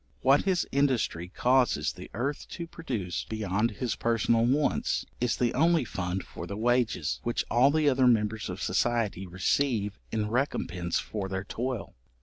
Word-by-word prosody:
What 135 +2 +4
his 185 -3 +2
industry 130 -11 +1
causes 120 - +2
the - - -10
earth 140 +4 -2
to 170 - -5
produce 120 - -4
beyond 110 0 0
his 115 +2 -3
personal 115 0 +2
wants, 145 +4 +1
is 120 -1 0
the 120 -2 +1
only 165 +1 +3
fund 90 -2 -3
for - - -8
the 100 - -5
wages, 120 -8 +1
which 120 - -1
all 125 +4 +5
the 155 0 +2
other 130 -2 +4
members 110 -3 +1
of 90 +2 -5
society 105 -2 0
receive 105 - 0
in 105 -1 -1
recompence 90 - -1
for 100 -3 -4
their 95 0 -3
toil. 120 +2 -4
115 Hz, 155 wpm, -28 LUFS, 100-130 Hz, -, all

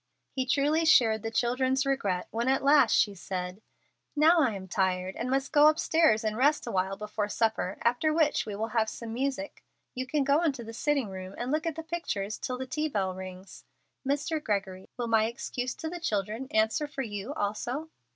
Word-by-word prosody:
He 260 -1 -2
truly 295 +5 +2
shared 225 -9 +5
the 225 - -3
children's 260 +3 +1
regret 205 -10 -1
when 235 +2 -1
at 265 +1 +2
last 285 +1 +5
she 205 - +3
said, 180 +1 -5 0.5
"Now 320 +3 +5
I 245 -8 +2
am 190 -1 -7
tired, 185 0 0
and 240 - -3
must 270 +1 0
go 295 -1 +7
upstairs 310 -6 +3
and 215 -1 -1
rest 290 +6 +2
awhile 190 +1 -1
before 210 0 -3
supper, 220 -4 0
after 245 +7 +2
which 310 -2 +2
we 205 - -4
will 220 +2 -3
have 220 -1 +1
some 225 0 -7
music. 275 +4 -3 0.3
You 255 0 -4
can 290 +2 +1
go 285 +3 +3
into 280 -8 0
the 225 0 -8
sitting 275 -1 0
room 185 0 -8
and 245 +2 -3
look 310 +2 0
at 325 - -2
the 325 - -6
pictures 265 - -3
till 255 - -3
the 260 - -4
tea 305 +4 -2
bell 195 -9 -1
rings. 185 0 -9 0.4
Mr. 290 +3 -1
Gregory, 190 -3 -3
will 245 - -2
my 225 -1 +3
excuse 245 +2 -4
to 320 - -5
the 350 +2 -5
children 215 - -2
answer 220 +7 +1
for 275 -2 -4
you 210 +4 -5
also?" 240 +9 -3
240 Hz, 200 wpm, -29 LUFS, 205-290 Hz, 0.5 s, go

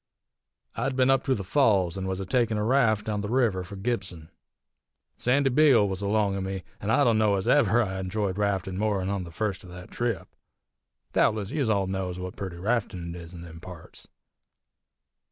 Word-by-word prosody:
"I'd 135 -1 -1
been 130 0 +4
up 135 -1 +3
to 135 -2 +2
the 100 - -4
Falls, 95 - +2
an' 95 -1 -4
was 95 0 -2
a 95 - -4
takin' 115 +1 +1
a 105 - 0
raft 115 -3 +2
down 105 -1 -2
the 105 - -4
river 115 -7 +1
fur 90 +3 -9
Gibson. 95 -7 -4 0.9
Sandy 135 +2 +2
Beale 130 -6 +5
was 95 0 -4
along 100 -1 +1
o' 100 - -2
me, 95 -1 -4 0.2
an' 105 - -4
I 130 +6 +4
dunno 110 -4 +3
ez 95 - -2
ever 120 -5 +4
I 95 -2 -4
enjoyed 95 +1 -2
raftin' 95 -2 -1
more 105 -2 +1
'n 95 0 -2
on 100 -2 -2
the 85 - -10
first 100 +1 -3
o' - - -12
thet 90 0 -11
trip. 115 -7 -2 0.9
Doubtless 105 -2 +1
yez 140 -6 0
all 100 -3 +2
knows 95 -1 -3
what 90 0 -6
purty 95 -3 -6
raftin' 95 -4 -2
it 90 - -8
is 85 +1 -11
in 85 - -9
them 85 -1 -10
parts. 90 -1 -11
100 Hz, 200 wpm, -27 LUFS, 95-115 Hz, 0.9 s, Beale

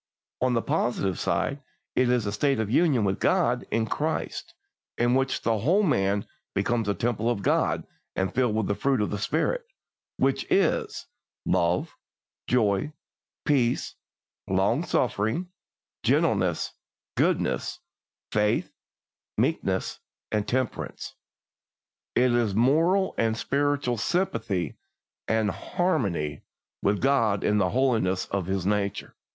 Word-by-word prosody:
On 130 0 +2
the 115 - +1
positive 100 -6 0
side 140 +12 -1 0.3
it 125 -1 +3
is 125 -3 +2
a 100 - -1
state 135 +4 +1
of 110 -1 -1
union 140 -5 +3
with 95 -1 0
God - - +2
in 115 -1 +1
Christ, - - -3 0.4
in 120 +1 +2
which 135 0 +1
the 115 -2 +1
whole 180 - +3
man 100 - +1 0.3
becomes 110 +2 0
a 100 - +1
temple 115 +3 0
of 110 -5 -1
God - - +1 0.3
and 95 0 -1
filled 125 -4 +1
with 110 -2 +1
the 100 - 0
fruit 130 +6 +1
of 105 - 0
the 105 - -2
Spirit, - - 0 0.5
which - - +1
is 425 +3 +1 0.4
"love, - - +1 0.5
joy, 110 +3 +1 0.5
peace, 130 -6 +1 0.5
long - - +2
suffering, 130 - 0 0.5
gentleness, - - +1 0.4
goodness, - - +1 0.5
faith, 105 0 +1 0.6
meekness, - - 0 0.5
temperance." 130 0 -2 1.0
It 125 0 +4
is 115 -5 +1
moral 165 - +3
and 110 0 +1
spiritual 140 -2 0
sympathy 110 - -1 0.5
and 110 -2 +2
harmony 100 - -1 0.4
with 100 0 +1
God 115 -7 +2
in 105 0 +2
the 95 -2 +2
holiness 115 -8 +1
of 95 -3 -1
His 95 -1 -1
nature. 100 -1 -1
115 Hz, 125 wpm, -26 LUFS, 100-135 Hz, 1.0 s, It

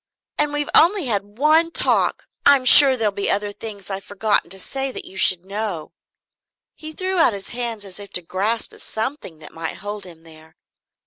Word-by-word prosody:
And 295 0 +2
we've 295 0 -3
only 355 0 +5
had 205 -3 -3
one 310 +4 +3
talk - - 0 0.2
I'm 280 -2 +4
sure 265 +1 +8
there'll 220 -3 0
be 200 0 -3
other 205 0 -1
things 205 -2 -8
I've 195 0 -5
forgotten 205 -1 -1
to 190 - -5
say 270 +6 -3
that - - -8
you - - -13
should 185 -1 +4
know 195 -5 -5 0.4
" - - -70
He 310 - -6
threw 370 +3 -2
out 325 - +4
his 195 -1 -7
hands 235 -4 -4
as 190 0 -10
if 200 -1 -11
to 180 - +1
grasp 205 +7 -3
at - - -14
something 220 - -5
that 155 -1 -14
might 165 0 -6
hold 205 0 -7
him 165 -3 -15
there. 160 -1 -17
210 Hz, 200 wpm, -20 LUFS, 190-270 Hz, 0.4 s, sure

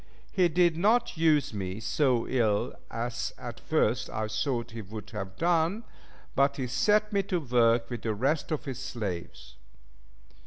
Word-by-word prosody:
He 185 -3 +3
did 170 0 +3
not 225 +6 +2
use 155 -6 +3
me 95 -1 -4
so 125 0 +1
ill 110 -5 +1 0.2
as 120 +1 -3
at - - -7
first - - +1
I 110 0 -2
thought 115 +3 -1
he 115 0 -6
would 105 0 -9
have 95 -4 -5
done, 170 - +1 0.5
but 140 +1 +2
he 130 - -1
set 210 - +2
me 200 - +3
to 185 -2 -1
work 120 -4 +3
with 120 - -4
the 110 -2 -1
rest 140 +9 0
of 155 - -2
his 130 -2 -5
slaves. 90 - -6
125 Hz, 160 wpm, -29 LUFS, 110-165 Hz, 0.5 s, He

